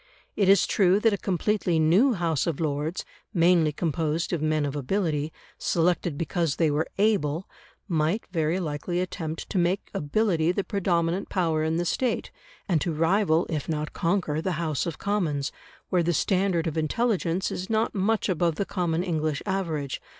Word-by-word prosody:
It 200 -2 +2
is 195 -1 +6
true 190 0 +3
that 225 0 +3
a - - +3
completely 190 -2 0
new 180 - +4
House 170 - 0
of 165 -4 -1
Lords, 155 +2 -2 0.3
mainly 170 -2 +4
composed 160 +2 -1
of 165 - -1
men 155 -1 +1
of 140 0 -3
ability, 150 0 -1 0.3
selected 170 -2 +1
because 165 -2 -1
they 160 -3 +2
were 150 +2 0
able, 190 -6 +1 0.4
might 165 +4 0
very 165 +1 0
likely 170 +1 -2
attempt 165 -3 -4
to 195 - +1
make 175 +3 0
ability 170 +1 +1
the 200 - -1
predominant 175 -2 0
power 165 -5 +1
in 160 +1 0
the 175 - 0
State, 250 +8 -1 0.4
and 170 -6 +2
to 170 - -1
rival, 165 +1 +2
if 155 -2 -3
not 155 -1 -2
conquer, 165 -3 0
the 185 +2 -1
House 155 -2 -1
of 165 - -4
Commons, 165 -9 -1 0.4
where 180 - +2
the 170 +1 +1
standard 185 -1 +1
of 160 -1 -1
intelligence 185 +1 0
is 185 - -5
not 225 +1 +1
much 210 +2 +1
above 175 -3 +1
the 200 - -1
common 175 -3 -1
English 155 -4 -1
average. 165 -8 -2
170 Hz, 170 wpm, -26 LUFS, 155-190 Hz, 0.4 s, is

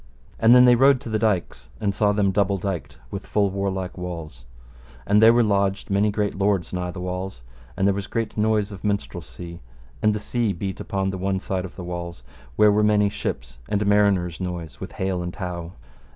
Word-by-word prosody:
And 115 +2 +7
then 125 0 +8
they 125 - +7
rode 135 +2 +5
to 120 - -7
the 110 -1 0
dykes, 105 -5 -1
and 100 -3 0
saw 105 +1 +2
them 100 -1 +2
double 100 0 +1
dyked 85 -8 -4
with 100 -1 -6
full 100 -2 +1
warlike 95 -1 -3
walls; 85 -7 -7 0.6
and 105 +1 +4
there 110 +1 +8
were 120 0 +4
lodged 100 -2 0
many 100 +2 +3
great 105 0 -1
lords 95 -3 0
nigh 90 -1 -2
the 90 - -7
walls; 90 -6 -5 0.3
and 95 - +1
there 100 - +4
was 100 0 -4
great 115 -1 -3
noise 110 -1 +1
of 95 -3 -10
minstrelsy; 90 -4 -4 0.4
and 105 0 +3
the - - -2
sea 115 -1 -1
beat 95 +2 -5
upon 95 -1 -2
the 95 - -5
one 95 0 0
side 95 -2 -3
of 90 - -10
the 90 - -7
walls, 85 -5 -6 0.3
where 105 -1 +6
were 105 +1 +3
many 105 -1 +3
ships - - -5
and 105 0 0
mariners' 100 -4 +2
noise 85 -4 -5
with - - -7
"hale 95 -1 -2
and 90 0 -5
how." 90 -3 -5
100 Hz, 205 wpm, -23 LUFS, 90-105 Hz, 0.6 s, then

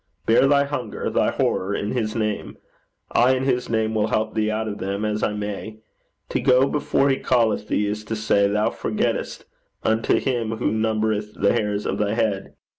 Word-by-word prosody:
Bear 115 +4 +5
thy 140 0 +4
hunger, 145 +1 -4
thy - - +2
horror 100 +2 0
in 105 - -2
his 110 -3 -2
name. 105 -2 -2 0.5
I 125 +2 +4
in 130 - -2
his 125 -2 0
name 110 -1 0
will 110 -1 +1
help 110 0 -1
thee 110 -1 0
out 110 +1 -2
of 105 -1 -5
them, 100 +2 -2
as 105 0 -1
I 105 - 0
may. 105 +1 -5 0.5
To - - 0
go 130 +1 +4
before 140 -1 +1
he 135 - +1
calleth 115 -4 +1
thee, 105 - +1
is 105 +1 -3
to 110 - -3
say 105 -2 +2
'Thou 105 +2 +1
forgettest,' - - -2 0.4
unto 110 +1 +2
him 115 -4 -1
who - - 0
numbereth 110 -1 -1
the 100 - +2
hairs 105 -3 -1
of - - -2
thy 105 0 0
head. 105 -4 -1
110 Hz, 190 wpm, -23 LUFS, 105-120 Hz, 0.5 s, Bear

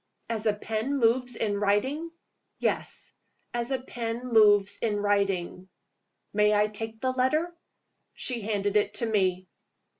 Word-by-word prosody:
"As 225 -1 -2
a 210 - +4
pen 225 +6 -2
moves 245 0 +2
in 205 -3 -1
writing?" 260 +11 0 0.5
"Yes. - - 0 0.4
As 240 0 -1
a 265 -1 0
pen 240 -1 -5
moves 205 -3 +5
in 220 -3 0
writing." 195 -3 -1 0.6
"May 210 0 +3
I 210 0 +4
take 220 +1 -6
the 260 +2 0
letter?" 305 +7 0 0.6
She 245 -3 -1
handed 205 -1 0
it 205 0 +1
to 235 - +2
me. 185 -4 0
220 Hz, 140 wpm, -27 LUFS, 205-245 Hz, 0.6 s, moves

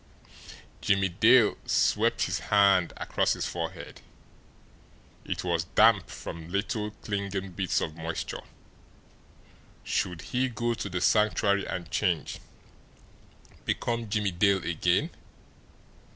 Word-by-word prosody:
Jimmie 95 -1 +2
Dale 115 +5 +4
swept - - +2
his - - -1
hand 100 -4 +3
across - - 0
his - - -3
forehead. - - -6 1.2
It - - -3
was 85 -2 0
damp 110 -3 +5
from 85 0 -8
little 105 +3 -2
clinging 100 -2 -4
beads 90 +1 -1
of 75 - -4
moisture. 80 0 -5 1.4
Should 90 -3 -2
he 130 +1 +1
go 120 0 -1
to 110 -3 -5
the 90 -1 -3
Sanctuary 100 +1 +2
and 85 -4 -5
change 85 -4 -1 1.2
become 115 -2 -2
Jimmie 105 -2 0
Dale 95 +1 +2
again? 85 -2 +1
100 Hz, 110 wpm, -28 LUFS, 90-105 Hz, 1.4 s, damp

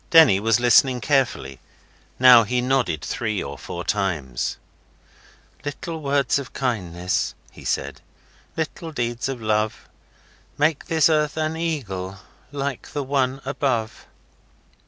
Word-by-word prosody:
Denny 160 - +7
was 115 +2 +2
listening 125 +1 +5
carefully. 120 - 0 0.6
Now 125 -2 +9
he 125 +4 0
nodded 125 - 0
three 110 -4 -2
or 70 +1 -6
four 85 +4 -6
times. 85 -13 -2 1.1
'Little 155 +3 -5
words 140 -2 +1
of 140 - -8
kindness' 90 -9 -1 0.2
(he - - -14
said), - - -2 0.6
'Little 160 +1 -4
deeds 120 -1 -2
of 135 -2 -4
love, 110 -1 -1 0.7
Make 150 0 +1
this 160 -4 +4
earth 150 -2 +1
an 155 0 -1
eagle 100 - -3 0.3
Like 140 -2 -4
the 145 - -2
one 135 -1 0
above. 130 -5 -2
125 Hz, 120 wpm, -23 LUFS, 105-145 Hz, 1.1 s, Now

